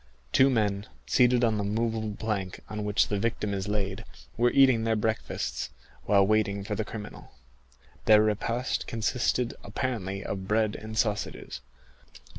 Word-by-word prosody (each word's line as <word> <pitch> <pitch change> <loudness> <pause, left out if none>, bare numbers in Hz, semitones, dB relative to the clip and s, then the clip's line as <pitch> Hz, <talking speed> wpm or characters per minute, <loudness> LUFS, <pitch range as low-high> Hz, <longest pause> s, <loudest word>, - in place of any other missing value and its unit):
Two 135 +1 +6
men, 105 -4 0 0.2
seated 125 -1 +4
on 110 -3 +2
the - - -1
movable 110 0 -1
plank 100 -4 -3
on 105 -1 -4
which 105 0 +2
the 105 - 0
victim 105 -1 -1
is 95 0 -3
laid, 100 -2 -2 0.3
were 120 +1 +3
eating 130 -4 +5
their 115 0 +1
breakfasts, 110 +1 -2 0.4
while 100 -1 +5
waiting 100 -1 +1
for 105 - -4
the 110 - -1
criminal. 105 0 -9 0.7
Their 105 0 +7
repast 115 +4 -1
consisted 115 +1 0
apparently 100 -3 -3
of 95 -1 -4
bread 110 0 +1
and 110 0 -7
sausages. 105 -2 -2
110 Hz, 145 wpm, -28 LUFS, 100-115 Hz, 0.7 s, Their